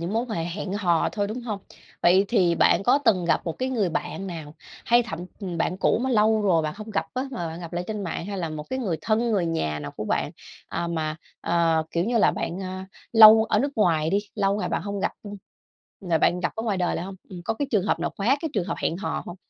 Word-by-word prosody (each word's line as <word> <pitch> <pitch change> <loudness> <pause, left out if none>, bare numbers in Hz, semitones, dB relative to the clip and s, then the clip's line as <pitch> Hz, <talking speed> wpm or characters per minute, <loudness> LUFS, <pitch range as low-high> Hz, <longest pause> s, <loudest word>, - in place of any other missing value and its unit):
những 170 +4 -3
mối 230 +2 +1
quan 215 - -3
hệ 165 - -1
hẹn 185 +3 -4
hò 175 -5 +2
thôi, 205 -1 -1
đúng 225 +4 -5
hông? 215 -4 -3 0.4
Vậy 185 +3 +5
thì 185 -7 +3
bạn 170 - +4
có 250 +7 +4
từng 215 -10 +2
gặp 170 - +2
một 165 - -2
cái 255 +1 -1
người 220 -8 +1
bạn 195 +3 -3
nào, 160 -4 -7 0.3
hay 240 +1 +4
thậm 165 -8 -6 0.2
ừm, 180 -4 -4
bạn 180 - 0
cũ 195 - +2
mà 260 - 0
lâu 220 -2 +3
rồi 170 -5 +3
bạn 155 +1 -3
hông 215 +1 -8
gặp 200 - -1
á, 255 - 0
mà 205 -10 -4
bạn 165 +2 -7
gặp 170 -1 -8
lại 175 +1 -2
trên 210 -2 -4
mạng 170 0 -4
hay 200 -1 -4
là 170 -3 -2
một 155 -1 -5
cái 260 - -1
người 190 -10 -1
thân, 230 +5 +1
người 190 -5 +1
nhà 80 - -1
nào 70 -1 -6
của - - -4
bạn, - - -1 0.4
ờ, 170 - -3
mà, 155 -2 -2 0.2
ờ, 165 -1 +2
kiểu 170 +1 0
như, 235 +2 +1
là - - +5
bạn, 175 +3 -4
ờ, 185 0 -5 0.3
lâu 220 0 +9
ở - - +1
nước 280 +1 0
ngoài 165 -6 +2
đi, 200 - +3 0.2
lâu 200 -1 +1
ngày 210 - -2
bạn - - -1
hông 200 -1 -4
gặp, - - 0
ứm, 205 -1 -7 0.6
rồi 175 -5 +1
bạn 175 +3 +2
gặp 175 - -1
ở 225 - -2
ngoài 210 -4 0
đời 180 -1 0
lại - - -3
hông? 195 +1 -7
Ừm, 180 -2 -8
có 225 - -1
cái 280 +4 -3
trường 205 -5 +2
hợp - - +1
nào - - -1
khóa 235 +8 +2
cái 320 - -2
trường 195 -5 +1
hợp - - -3
hẹn 165 - 0
hò 195 - -3
hông? 175 - -7
190 Hz, 275 wpm, -25 LUFS, 170-220 Hz, 0.6 s, lâu